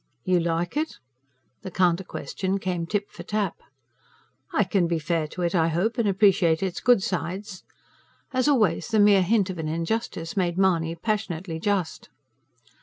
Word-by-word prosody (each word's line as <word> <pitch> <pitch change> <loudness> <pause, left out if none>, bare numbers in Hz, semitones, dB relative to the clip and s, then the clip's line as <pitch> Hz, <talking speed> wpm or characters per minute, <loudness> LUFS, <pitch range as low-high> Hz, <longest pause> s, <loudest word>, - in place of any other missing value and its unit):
"You 180 -1 +3
like 170 - -1
it?" 315 +1 -1 0.7
The - - -6
counter 180 0 +2
question 190 +1 -3
came 180 -3 -3
tip 205 +1 -2
for - - -10
tap. 210 -4 -2 0.9
"I 210 - +3
can 185 -2 +1
be 170 0 0
fair 160 0 -1
to 180 +3 -5
it, 170 - 0
I 165 -3 +3
hope, 190 +9 0
and 225 - +2
appreciate 190 -4 +3
its 185 -2 -2
good 245 -6 +4
sides." 185 +2 -4 0.7
As 255 +2 +1
always, 220 - +2
the 225 - 0
mere 205 -2 +6
hint 195 0 +2
of 180 - -8
an 160 - -3
injustice 165 +1 -3
made 175 -3 0
Mahony 170 -4 +2
passionately 180 -4 -3
just. 195 -2 -2
185 Hz, 165 wpm, -25 LUFS, 170-205 Hz, 0.9 s, mere